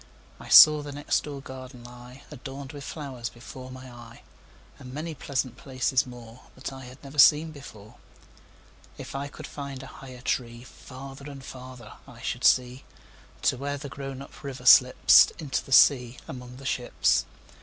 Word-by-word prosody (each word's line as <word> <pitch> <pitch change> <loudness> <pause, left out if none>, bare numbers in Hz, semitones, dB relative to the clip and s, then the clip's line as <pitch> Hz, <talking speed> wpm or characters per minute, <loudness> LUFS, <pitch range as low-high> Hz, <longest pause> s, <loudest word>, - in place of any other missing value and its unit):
I - - -11
saw 150 -1 +9
the 145 0 -7
next 145 +1 -1
door 145 -2 -7
garden 130 -2 -10
lie, 125 +2 -13
Adorned 135 0 -8
with 145 -2 -9
flowers, 130 -7 -6
before 130 +2 -11
my 130 0 -10
eye, 120 -1 -13 0.6
And 125 - -10
many 155 +4 -5
pleasant 130 -3 -3
places 130 0 0
moreThat 125 +2 -10
I 130 -1 -10
had 125 +3 -14
never 140 +1 -7
seen 155 +3 +6
before. 120 -6 -13 1.0
If - - -9
I 140 +1 -4
could 140 - -10
find 140 -2 -7
a - - -12
higher 130 -2 -11
treeFarther 130 +3 -6
and 135 -2 -10
farther 125 -3 -11
I - - -14
should - - -3
see, 125 +1 +3 0.6
To - - +2
where 145 +2 -3
the 140 0 -8
grown 135 -1 -7
up - - -15
river 135 -2 -7
slipsInto 130 +3 +5
the - - -13
sea 125 -2 +5
among 125 -1 -9
the 135 - -12
ships. 125 -2 +1
130 Hz, 160 wpm, -26 LUFS, 125-140 Hz, 1.0 s, saw